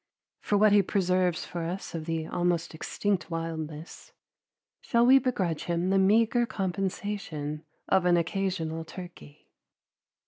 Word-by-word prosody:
For 205 - 0
what 210 +1 +5
he 205 0 +6
preserves 185 -3 +1
for 175 - -5
us 175 +4 -5
of 160 -2 -4
the 165 -1 -2
almost 175 0 -1
extinct 180 +2 -2
wildness, 160 -1 -6 0.7
shall 235 0 +2
we 265 +2 +7
begrudge 190 - -1
him 175 +2 0
the 195 - +4
meagre 225 +5 +3
compensation 185 -6 -3 0.2
of 190 -2 +3
an 175 -1 +4
occasional 170 -2 -2
turkey? 170 -4 -11
180 Hz, 130 wpm, -28 LUFS, 165-200 Hz, 0.7 s, we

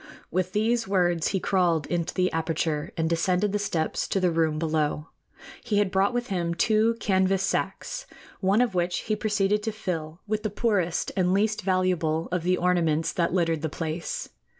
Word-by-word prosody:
With 185 +1 -1
these 225 +1 +1
words 175 -4 +2
he 195 - 0
crawled 175 -5 +1
into 170 -1 -1
the 185 -1 +2
aperture 160 -2 -1
and 160 -1 +1
descended 180 +4 +1
the 205 - 0
steps 165 -6 -1
to 195 - 0
the 180 -2 +2
room 160 -2 +1
below. 155 -1 -1 0.5
He 220 -4 0
had 205 -2 +2
brought 195 +3 +2
with 245 0 -2
him 170 -3 -1
two 220 +4 +3
canvas 190 0 +2
sacks, - - -2 0.3
one 195 +4 +3
of 245 -5 +1
which 175 0 0
he 215 - -1
proceeded 210 -1 +1
to 220 +1 -2
fill 165 -6 -4
with 215 0 -1
the 215 - -2
poorest 190 -6 0
and 185 0 +2
least 215 +2 +1
valuable 180 -4 +1
of 180 -1 0
the 180 +2 +1
ornaments 165 -3 +1
that 170 -2 0
littered 165 -3 +1
the 160 - -1
place. 160 +2 -4
180 Hz, 180 wpm, -26 LUFS, 165-205 Hz, 0.5 s, two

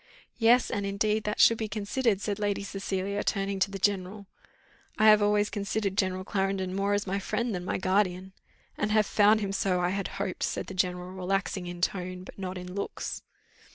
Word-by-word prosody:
"Yes, 240 +2 +4
and 200 - -1
indeed 210 +2 0
that 210 - -2
should 230 - +6
be 220 - -1
considered," 210 +1 0
said 205 -1 -2
Lady 205 -1 -1
Cecilia, 195 0 -3
turning 195 -1 -1
to 190 - +2
the 195 - -5
general. 195 +1 -1 0.7
"I 215 - +3
have 215 0 +7
always 205 0 +2
considered 200 -1 -2
General 185 -1 0
Clarendon 190 -1 -1
more 200 +1 +1
as 205 - -1
my 195 +1 -1
friend 235 +3 -2
than 180 -1 -3
my - - -1
guardian." 190 -1 0 0.5
"And 210 - 0
have 215 0 +4
found 215 +2 +4
him 200 -1 -2
so, 190 -2 +1
I 175 0 +1
had 195 +1 -2
hoped," 190 -2 -3
said - - -1
the - - -8
general, 180 -1 -1
relaxing 190 0 -2
in 175 0 -7
tone 185 0 -2
but 190 - -12
not 185 -1 -4
in 180 0 -7
looks. 200 - -4
195 Hz, 195 wpm, -28 LUFS, 185-205 Hz, 0.7 s, have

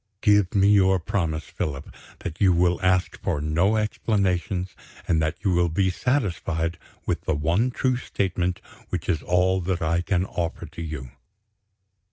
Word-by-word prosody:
Give 105 -3 +3
me 100 0 +5
your 95 -2 +5
promise, 80 -3 -2
Philip, 70 -2 -5 0.3
that 80 +3 -6
you 95 -3 +5
will 85 +1 +2
ask 90 -1 +1
for - - -1
no 85 +8 +2
explanations, 95 -4 -1 0.3
and 80 -2 +2
that 80 +1 0
you 95 - +1
will 85 -1 +2
be 95 +3 +1
satisfied 90 - -1 0.3
with - - -1
the 80 - +1
one 85 - +1
true 130 0 0
statement 90 -6 -2 0.3
which - - -3
is 80 - +1
all 90 +2 +2
that 90 -1 -1
I 85 +2 +1
can 90 +1 0
offer 85 -2 -3
to 80 +2 -9
you." 75 -6 -6
90 Hz, 160 wpm, -25 LUFS, 80-95 Hz, 0.3 s, me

